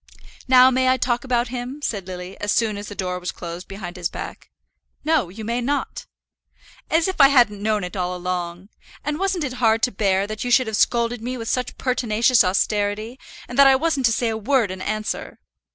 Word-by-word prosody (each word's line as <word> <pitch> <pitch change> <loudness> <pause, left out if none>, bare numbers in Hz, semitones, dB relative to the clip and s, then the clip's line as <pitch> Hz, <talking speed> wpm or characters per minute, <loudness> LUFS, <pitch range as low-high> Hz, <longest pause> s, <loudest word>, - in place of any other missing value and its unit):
"Now 255 0 +7
may 260 0 +2
I 260 - +3
talk 240 -2 0
about 245 -2 0
him?" 250 +3 -5
said 200 -8 -3
Lily, 180 0 -7
as 205 - 0
soon 220 -2 +1
as 205 0 -7
the 205 - -8
door 180 -1 -3
was 180 - -4
closed 170 +1 -8
behind 190 -2 -8
his 175 -1 -2
back. - - -8 0.6
"No; 310 - +2
you 215 +4 -8
may 235 +2 -1
not." 280 +4 -3 0.8
"As 325 +2 +2
if 375 -5 +1
I 275 - +10
hadn't 240 -7 +3
known 215 -1 0
it 180 +1 -6
all 180 -1 -2
along! 180 +1 -4 0.4
And 295 +2 -2
wasn't 385 -3 0
it 260 -3 -3
hard 225 -1 +3
to 250 - +3
bear 195 -1 +1
that 215 +1 -5
you 245 - -2
should 255 +1 +4
have 220 -1 -3
scolded 235 +1 +1
me 250 +2 -4
with 230 -1 -5
such 250 -1 -2
pertinacious 240 -2 +2
austerity, 205 +5 -1 0.3
and 245 +3 -4
that 280 - +9
I 270 - +6
wasn't 280 -3 +1
to - - +1
say 230 +1 0
a 220 - -2
word 225 -2 +1
in 185 0 -7
answer!" 215 +2 -4
225 Hz, 215 wpm, -22 LUFS, 195-255 Hz, 0.8 s, I